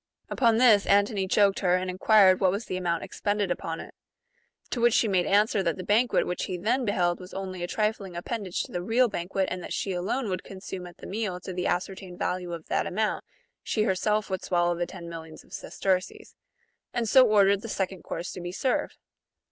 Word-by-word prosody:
Upon 230 Hz, -3 st, +3 dB
this, 225 Hz, -5 st, +5 dB
Antony 200 Hz, -1 st, +3 dB
joked 200 Hz, 0 st, +3 dB
her, 180 Hz, -2 st, +3 dB
and 185 Hz, 0 st, -1 dB
enquired 185 Hz, 0 st, +5 dB
what 190 Hz, -, +4 dB
was 200 Hz, +5 st, -2 dB
the -, -, -4 dB
amount 175 Hz, -2 st, -1 dB
expended 205 Hz, -2 st, -1 dB
upon 165 Hz, -2 st, -3 dB
it; -, -, -9 dB, 0.8 s
to 240 Hz, -, -2 dB
which 235 Hz, -1 st, +4 dB
she 230 Hz, -, +3 dB
made 185 Hz, -3 st, +1 dB
answer 205 Hz, 0 st, +3 dB
that 170 Hz, -2 st, -1 dB
the 185 Hz, -, -5 dB
banquet 225 Hz, +5 st, +2 dB
which 180 Hz, -, -2 dB
he 185 Hz, -, -4 dB
then 240 Hz, +8 st, 0 dB
be 205 Hz, -, +1 dB
held 175 Hz, -3 st, +1 dB
was 180 Hz, 0 st, -11 dB
only 190 Hz, -2 st, -5 dB
a 175 Hz, -, -2 dB
trifling 210 Hz, -3 st, -2 dB
appendage 190 Hz, +1 st, -3 dB
^^ -, -, -7 dB
to -, -, -14 dB
the 175 Hz, -, -3 dB
real 230 Hz, +6 st, +3 dB
banquet, 190 Hz, -1 st, -2 dB
and 185 Hz, -, -3 dB
that -, -, -6 dB
she 195 Hz, -, -2 dB
alone 190 Hz, +9 st, -1 dB
^ -, -, -3 dB
would 185 Hz, -1 st, -3 dB
consume 190 Hz, -1 st, -8 dB
at 175 Hz, 0 st, -14 dB
the -, -, -11 dB
meal 200 Hz, -3 st, -3 dB
to 185 Hz, -, -6 dB
the 180 Hz, 0 st, -1 dB
ascertained 185 Hz, 0 st, -3 dB
value 180 Hz, -1 st, -2 dB
of 165 Hz, -2 st, -6 dB
that -, -, 0 dB
amount, 215 Hz, +3 st, -1 dB, 0.4 s
she 215 Hz, -, 0 dB
herself 210 Hz, +1 st, +1 dB
would 190 Hz, -2 st, -3 dB
swallow 175 Hz, -1 st, +1 dB
the 175 Hz, 0 st, -2 dB
ten 175 Hz, -2 st, -9 dB
millions 160 Hz, -1 st, -9 dB
of -, -, -19 dB
sesterces; 185 Hz, -1 st, -2 dB, 0.6 s
and 235 Hz, -2 st, 0 dB
so 260 Hz, +4 st, +7 dB
ordered 200 Hz, -2 st, +4 dB
the 230 Hz, -, -7 dB
second 190 Hz, -2 st, -2 dB
course 170 Hz, +2 st, -5 dB
to 180 Hz, -, -7 dB
be 175 Hz, 0 st, -5 dB
served. 255 Hz, +7 st, -1 dB
190 Hz, 220 wpm, -27 LUFS, 180-210 Hz, 0.8 s, so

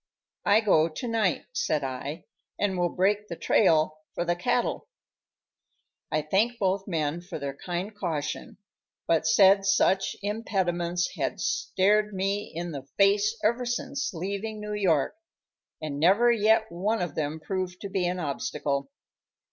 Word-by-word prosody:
"I 210 Hz, +2 st, +6 dB
go 165 Hz, -7 st, +4 dB
to 205 Hz, +10 st, -6 dB
night," 225 Hz, -6 st, 0 dB
said 150 Hz, -2 st, 0 dB
I, 135 Hz, +5 st, -5 dB, 0.3 s
"and 200 Hz, -2 st, 0 dB
will 175 Hz, -1 st, +1 dB
break 205 Hz, +4 st, +1 dB
the 170 Hz, -, -5 dB
trail 155 Hz, -1 st, +3 dB, 0.2 s
for 175 Hz, -, -1 dB
the 175 Hz, 0 st, +1 dB
cattle." 175 Hz, -, -1 dB, 1.2 s
I 155 Hz, 0 st, +1 dB
thanked 210 Hz, +10 st, +1 dB
both 195 Hz, -1 st, 0 dB
men 160 Hz, -2 st, -1 dB
for 175 Hz, 0 st, -7 dB
their 140 Hz, -2 st, -4 dB
kind 180 Hz, +7 st, -4 dB
caution, 165 Hz, -8 st, -4 dB, 0.5 s
but 165 Hz, -1 st, +2 dB
said 195 Hz, -2 st, +6 dB
such 195 Hz, -1 st, +2 dB
impediments 180 Hz, -5 st, -1 dB
had -, -, -2 dB
stared 210 Hz, +2 st, +1 dB
me 195 Hz, +2 st, -1 dB
in 170 Hz, +1 st, -4 dB
the 140 Hz, -3 st, -7 dB
face 205 Hz, +3 st, +3 dB
ever 235 Hz, +3 st, +2 dB
since 265 Hz, +3 st, -2 dB
leaving 200 Hz, +4 st, -4 dB
New 210 Hz, 0 st, -5 dB
York, 180 Hz, -, +1 dB, 0.7 s
and 145 Hz, -2 st, -4 dB
never 200 Hz, +9 st, +5 dB
yet 220 Hz, -3 st, +3 dB
one 190 Hz, +4 st, 0 dB
of 175 Hz, -4 st, -4 dB
them 155 Hz, 0 st, -2 dB
proved 185 Hz, +3 st, -4 dB
to 200 Hz, -, -5 dB
be 190 Hz, -2 st, 0 dB
an 180 Hz, +1 st, -2 dB
obstacle. 145 Hz, -, -2 dB
185 Hz, 150 wpm, -27 LUFS, 165-210 Hz, 1.2 s, I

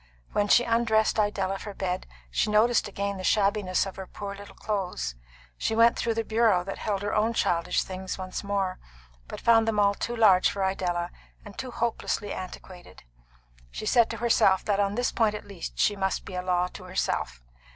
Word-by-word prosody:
When 205 Hz, 0 st, +1 dB
she 240 Hz, -, +5 dB
undressed 230 Hz, -2 st, +2 dB
Idella 195 Hz, -2 st, 0 dB
for 205 Hz, -2 st, -8 dB
bed 185 Hz, -1 st, -3 dB, 0.2 s
she 215 Hz, -, +1 dB
noticed 220 Hz, +2 st, +3 dB
again 200 Hz, 0 st, -3 dB
the 185 Hz, -, -6 dB
shabbiness 200 Hz, -2 st, +2 dB
of 195 Hz, -, -8 dB
her 190 Hz, -1 st, -7 dB
poor 200 Hz, -1 st, -6 dB
little 200 Hz, 0 st, -11 dB
clothes. 185 Hz, -, -3 dB, 0.5 s
She 220 Hz, -, 0 dB
went 230 Hz, +1 st, +5 dB
through 230 Hz, -1 st, -1 dB
the 225 Hz, -, 0 dB
bureau 220 Hz, -5 st, +2 dB
that 195 Hz, +1 st, -6 dB
held 200 Hz, -2 st, -2 dB
her 205 Hz, -, -2 dB
own 220 Hz, +2 st, +2 dB
childish 170 Hz, -6 st, +1 dB
things 190 Hz, 0 st, -5 dB
once 185 Hz, +1 st, -5 dB
more, 200 Hz, -2 st, -1 dB, 0.5 s
but -, -, -7 dB
found 225 Hz, -1 st, +4 dB
them 215 Hz, -2 st, +1 dB
all 200 Hz, 0 st, +4 dB
too 235 Hz, +4 st, -4 dB
large 200 Hz, -5 st, +5 dB
for 195 Hz, -, -3 dB
Idella, 175 Hz, -2 st, -1 dB, 0.3 s
and 205 Hz, -, -11 dB
too 260 Hz, -, -5 dB
hopelessly 230 Hz, -3 st, -2 dB
antiquated. 185 Hz, -, -9 dB, 0.7 s
She 215 Hz, -, -6 dB
said 235 Hz, +1 st, +4 dB
to 230 Hz, -, -4 dB
herself 220 Hz, -4 st, +3 dB
that 205 Hz, -1 st, +1 dB
on 200 Hz, 0 st, +1 dB
this 245 Hz, +1 st, 0 dB
point 220 Hz, -2 st, +1 dB
at -, -, -7 dB
least 195 Hz, -4 st, -8 dB
she 205 Hz, -, +3 dB
must 190 Hz, -1 st, -2 dB
be -, -, -9 dB
a 180 Hz, -, -2 dB
law 180 Hz, -1 st, +1 dB
to 185 Hz, -, -11 dB
herself. 180 Hz, -, -2 dB
200 Hz, 195 wpm, -27 LUFS, 185-220 Hz, 0.7 s, she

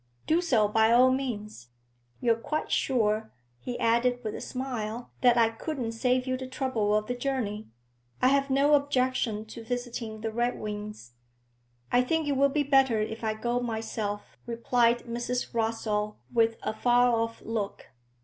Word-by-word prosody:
'Do 325 Hz, +3 st, +3 dB
so 240 Hz, -12 st, +3 dB
by 220 Hz, +2 st, +3 dB
all 250 Hz, +2 st, +6 dB
means. 215 Hz, -, -4 dB, 0.5 s
You're 235 Hz, -2 st, +4 dB
quite 265 Hz, +7 st, -3 dB
sure,' 220 Hz, -4 st, +1 dB, 0.3 s
he 245 Hz, -, -5 dB
added 245 Hz, +2 st, +2 dB
with 215 Hz, -, -3 dB
a -, -, -6 dB
smile, 245 Hz, -3 st, -4 dB
'that 245 Hz, -1 st, +5 dB
I 230 Hz, -1 st, +5 dB
couldn't 240 Hz, +1 st, -4 dB
save 250 Hz, +2 st, +1 dB
you 255 Hz, -1 st, -1 dB
the 260 Hz, 0 st, -6 dB
trouble 255 Hz, -6 st, 0 dB
of 215 Hz, 0 st, +1 dB
the 245 Hz, -, -2 dB
journey? 245 Hz, -5 st, -3 dB, 0.5 s
I 255 Hz, -, +4 dB
have 275 Hz, 0 st, +2 dB
no 280 Hz, +2 st, +3 dB
objection 255 Hz, -6 st, +1 dB
to 225 Hz, +1 st, -10 dB
visiting 235 Hz, -2 st, -4 dB
the 225 Hz, 0 st, -2 dB
Redwings.' 210 Hz, -, -3 dB, 0.8 s
'I 245 Hz, -, +5 dB
think 315 Hz, +4 st, 0 dB
it -, -, +1 dB
will 280 Hz, +1 st, +4 dB
be 290 Hz, +1 st, +1 dB
better 270 Hz, -5 st, +3 dB
if 220 Hz, +2 st, -3 dB
I 220 Hz, -1 st, 0 dB
go 240 Hz, +2 st, -1 dB
myself,' 220 Hz, -3 st, -4 dB
replied 235 Hz, 0 st, +2 dB
Mrs. 240 Hz, +1 st, -3 dB
Rossall, 220 Hz, -2 st, -1 dB, 0.2 s
with 230 Hz, -1 st, +3 dB
a -, -, -1 dB
far 245 Hz, +2 st, +3 dB
off 230 Hz, 0 st, -2 dB
look. 215 Hz, -3 st, -4 dB
235 Hz, 160 wpm, -28 LUFS, 220-255 Hz, 0.8 s, all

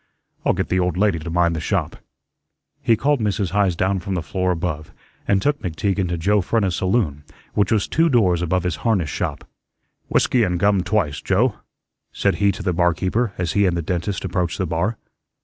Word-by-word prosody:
I'll -, -, +3 dB
get -, -, -2 dB
the 95 Hz, -, +1 dB
old 90 Hz, -1 st, 0 dB
lady 100 Hz, -4 st, +2 dB
to 80 Hz, +2 st, -6 dB
mind 85 Hz, 0 st, +2 dB
the -, -, -2 dB
shop." 80 Hz, -, -2 dB, 0.8 s
He 115 Hz, -, +3 dB
called 145 Hz, +4 st, +1 dB
Mrs. 100 Hz, -4 st, -1 dB
Heise 100 Hz, -2 st, +2 dB
down 95 Hz, +3 st, 0 dB
from 95 Hz, +2 st, -4 dB
the 85 Hz, -, -2 dB
floor 90 Hz, +4 st, -1 dB
above 80 Hz, -4 st, -2 dB, 0.4 s
and 100 Hz, -, +3 dB
took 145 Hz, 0 st, +1 dB
McTeague 95 Hz, +3 st, -1 dB
into 90 Hz, -2 st, -1 dB
Joe 100 Hz, +5 st, +2 dB
Frenna's 95 Hz, -2 st, 0 dB
saloon, 95 Hz, -7 st, 0 dB, 0.3 s
which 105 Hz, -2 st, +1 dB
was 110 Hz, -3 st, +2 dB
two 165 Hz, +1 st, +2 dB
doors 95 Hz, -, +3 dB
above 90 Hz, +1 st, 0 dB
his 90 Hz, -4 st, -2 dB
harness 95 Hz, -9 st, 0 dB
shop. -, -, -4 dB, 0.6 s
"Whiskey 125 Hz, -, +2 dB
and 90 Hz, -5 st, +1 dB
gum 100 Hz, 0 st, +3 dB
twice, 90 Hz, -7 st, -1 dB
Joe," 105 Hz, +5 st, +1 dB, 0.5 s
said -, -, 0 dB
he 100 Hz, -1 st, +3 dB
to 100 Hz, +1 st, -7 dB
the 90 Hz, -2 st, 0 dB
barkeeper 90 Hz, +6 st, +1 dB
as 90 Hz, -2 st, -1 dB
he 100 Hz, -1 st, +3 dB
and 85 Hz, -1 st, 0 dB
the 85 Hz, -, -2 dB
dentist 90 Hz, +4 st, -2 dB
approached 90 Hz, -2 st, -1 dB
the 95 Hz, -, -1 dB
bar. 90 Hz, +7 st, -1 dB
95 Hz, 200 wpm, -21 LUFS, 85-105 Hz, 0.8 s, I'll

